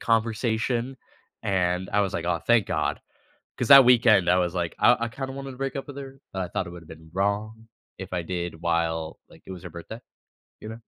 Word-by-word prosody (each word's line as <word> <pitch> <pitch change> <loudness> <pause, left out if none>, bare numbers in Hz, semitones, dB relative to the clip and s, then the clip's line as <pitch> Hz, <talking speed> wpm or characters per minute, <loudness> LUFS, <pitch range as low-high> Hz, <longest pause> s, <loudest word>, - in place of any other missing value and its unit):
conversation, 115 +2 0 0.5
and 90 -1 0
I 105 - +3
was 100 -2 -1
like, 85 - -2
"Aw, 85 -1 +1
thank 115 +2 +3
god," - - -1 0.6
'cause 125 - -1
that 140 -1 +11
weekend, 110 -7 +5
I 90 - +4
was 90 -1 0
like, 85 -2 -2
I 120 - +6
I - - -8
kinda 135 +2 -6
wanted 135 0 -7
to 125 - -12
break 135 -1 -3
up 135 - -5
with 140 - -9
her, 135 -1 -9
but 95 - -2
I 90 - -3
thought - - -3
it - - -7
would 85 -1 -10
have - - -19
been 80 0 -13
wrong 105 +3 -2 0.3
if 95 -1 -8
I 90 - -1
did 85 -1 -5
while, 80 -1 -1
like, - - -18
it - - -9
was 90 -1 -9
her 90 - -7
birthday, 85 +7 -9 0.6
you 110 - -7
know? 110 +1 -8
100 Hz, 230 wpm, -25 LUFS, 90-120 Hz, 0.6 s, that